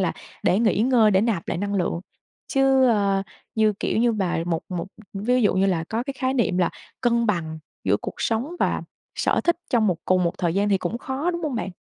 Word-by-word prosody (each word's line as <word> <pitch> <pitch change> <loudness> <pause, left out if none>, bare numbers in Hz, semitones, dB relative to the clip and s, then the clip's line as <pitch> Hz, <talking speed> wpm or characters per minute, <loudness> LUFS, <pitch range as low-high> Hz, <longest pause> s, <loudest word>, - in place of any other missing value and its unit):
là - - +1 0.3
để 190 - +3
nghỉ 220 -3 +2
ngơi, 235 -3 +4
để 190 -1 +4
nạp 210 -7 -1
lại - - -1
năng 200 +1 -2
lượng. 175 -2 0 0.5
Chứ, 270 -1 +4
ơ, 200 -3 +2 0.3
như, 220 -1 +3
kiểu - - 0
như, 235 0 +3
mà 185 -5 -1
một 165 -2 -1
một 180 -1 -3 0.3
ví 240 +5 +1
dụ 205 - +3
như 190 +1 +3
là 170 -4 0
có 225 +6 -2
cái 275 +1 -5
khái 260 0 0
niệm 215 -7 +1
là 175 - +2 0.3
cân 235 -2 +2
bằng 160 -6 -1 0.3
giữa 100 +1 +3
cuộc - - -5
sống 230 +5 0
và - - 0 0.3
sở - - +1
thích 345 -1 +3
trong 225 -3 +3
một 180 -4 +2
cùng 185 -1 +2
một 170 - +1
thời 170 -1 0
gian 205 +1 +2
thì 195 -2 +3
cũng 200 +7 -3
khó, 275 +8 -2
đúng 340 -1 -4
hông 295 -5 -2
bạn? 190 -5 -3
210 Hz, 230 wpm, -24 LUFS, 185-245 Hz, 0.5 s, ngơi